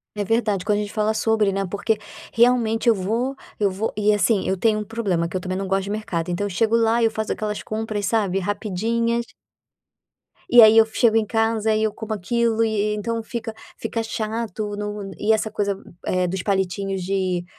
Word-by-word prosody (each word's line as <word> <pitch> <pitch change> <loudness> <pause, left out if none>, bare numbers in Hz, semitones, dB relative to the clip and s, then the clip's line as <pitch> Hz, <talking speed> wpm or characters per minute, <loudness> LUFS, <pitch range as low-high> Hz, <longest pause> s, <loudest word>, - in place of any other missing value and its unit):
É 205 -1 -2
verdade. 210 -3 0
Quando 210 -1 +2
a - - 0
gente 205 - -5
fala 215 0 +1
sobre, 220 -2 +1
né, 195 0 -1
porque, 205 +3 -1 0.4
realmente, 235 -1 +3
eu 230 - +5
vou 225 +8 -1 0.2
eu 200 -2 +1
vou 200 +4 -3
e, 210 0 +3
assim, 205 0 +2
eu 190 - 0
tenho 215 +2 +2
um - - -3
problema 200 -7 -1
que 185 - -3
eu - - -2
também 185 0 -3
não 195 0 -3
gosto 195 0 +1
de - - -6
mercado. 185 -5 -3
Então 175 +4 -1
eu 205 - -2
chego 220 +5 +1
lá, 230 0 +3
eu 225 - +4
faço 220 0 -3
aquelas 210 -1 -3
compras, 215 -2 -3
sabe, 200 -3 +1
rapidinhas 225 +4 -1 1.3
e 240 -5 +9
aí 220 0 +8
eu 225 - +8
chego 225 0 +2
em 220 - +2
casa 225 0 +1
e 215 - +1
eu 215 -1 0
como 220 -1 -5
aquilo 230 +3 +1
e 225 - +1
e 210 0 0
então 230 +2 -2
fica 225 -1 -5 0.2
fica 230 - -3
chato 220 -2 -3
no 205 -1 -5
e 220 +1 +3
essa 220 0 -1
coisa, 200 -2 -1 0.3
eh, 185 0 +1
dos 185 +1 -3
palitinhos 195 -1 -1
de 185 -2 -1
215 Hz, 210 wpm, -22 LUFS, 195-225 Hz, 1.3 s, e